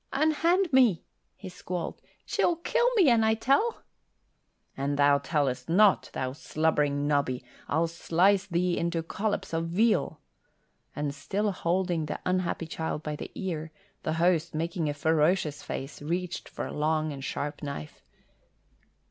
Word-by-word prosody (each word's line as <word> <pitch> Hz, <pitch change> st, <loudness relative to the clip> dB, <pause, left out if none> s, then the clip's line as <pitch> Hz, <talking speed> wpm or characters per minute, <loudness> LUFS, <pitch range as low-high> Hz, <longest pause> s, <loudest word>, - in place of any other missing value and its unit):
"Unhand 330 Hz, +4 st, +2 dB
me!" 240 Hz, -10 st, +5 dB, 0.3 s
he 200 Hz, -, -10 dB
squalled. 180 Hz, -1 st, -5 dB, 0.2 s
"She'll 345 Hz, -, +1 dB
kill 475 Hz, +8 st, +1 dB
me, 355 Hz, -, +6 dB
an 230 Hz, -1 st, +4 dB
I 220 Hz, 0 st, +3 dB
tell." 275 Hz, -, +1 dB, 0.9 s
"An 140 Hz, +1 st, -1 dB
thou 145 Hz, 0 st, +4 dB
tellest 140 Hz, -4 st, -1 dB
not, 200 Hz, +4 st, +4 dB
thou 130 Hz, -1 st, -2 dB
slubbering 145 Hz, 0 st, 0 dB
noddy, 140 Hz, -4 st, 0 dB, 0.2 s
I'll 160 Hz, +3 st, +2 dB
slice 180 Hz, +4 st, +2 dB
thee 175 Hz, -1 st, 0 dB
into 170 Hz, -1 st, -1 dB
collops 205 Hz, +2 st, -3 dB
of 165 Hz, 0 st, -1 dB
veal." 185 Hz, -3 st, +1 dB, 0.8 s
And 145 Hz, -1 st, -2 dB
still 205 Hz, +7 st, -1 dB
holding 175 Hz, -3 st, 0 dB
the -, -, -4 dB
unhappy 185 Hz, -2 st, 0 dB
child 160 Hz, -1 st, -4 dB
by 150 Hz, -1 st, -3 dB
the -, -, -7 dB
ear, 160 Hz, -5 st, -4 dB, 0.3 s
the 155 Hz, -, -1 dB
host, 170 Hz, -1 st, +1 dB
making 165 Hz, 0 st, -1 dB
a 145 Hz, -, -3 dB
ferocious 160 Hz, +1 st, +1 dB
face, 135 Hz, +2 st, -6 dB
reached 175 Hz, +4 st, -3 dB
for -, -, -5 dB
a -, -, -6 dB
long 155 Hz, 0 st, 0 dB
and 135 Hz, -1 st, -8 dB
sharp 145 Hz, +2 st, -4 dB
knife. 140 Hz, -, -6 dB
165 Hz, 145 wpm, -28 LUFS, 150-195 Hz, 0.9 s, me